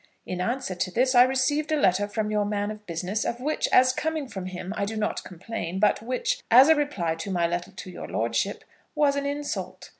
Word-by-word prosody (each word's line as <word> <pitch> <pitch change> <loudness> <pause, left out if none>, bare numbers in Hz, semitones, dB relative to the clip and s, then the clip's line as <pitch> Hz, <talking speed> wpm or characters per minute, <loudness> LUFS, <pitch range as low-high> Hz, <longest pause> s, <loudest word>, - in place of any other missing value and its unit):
In 180 -1 -4
answer 240 0 -2
to 185 +1 -2
this 255 +7 +2
I 245 - +8
received 265 +4 +2
a 310 - +3
letter 195 -2 +3
from 210 0 -2
your 210 -1 +1
man 205 0 -2
of 210 -1 -11
business, 180 +5 -2
of 235 - -3
which, 300 +5 -1
as 255 0 +5
coming 315 0 -2
from 190 -6 -6
him, 185 +1 -6
I - - -1
do 220 +2 -3
not 215 0 -2
complain, 185 0 -5
but 210 - +3
which, 250 +3 -2
as 255 +6 +8
a 320 - +7
reply 280 - -1
to 165 +5 -6
my 175 -3 +1
letter 175 +1 -2
to 185 - -9
your - - -8
lordship, 115 - -1 0.3
was 290 -2 +3
an 280 0 -1
insult. 290 +1 -4
215 Hz, 220 wpm, -26 LUFS, 185-260 Hz, 0.3 s, I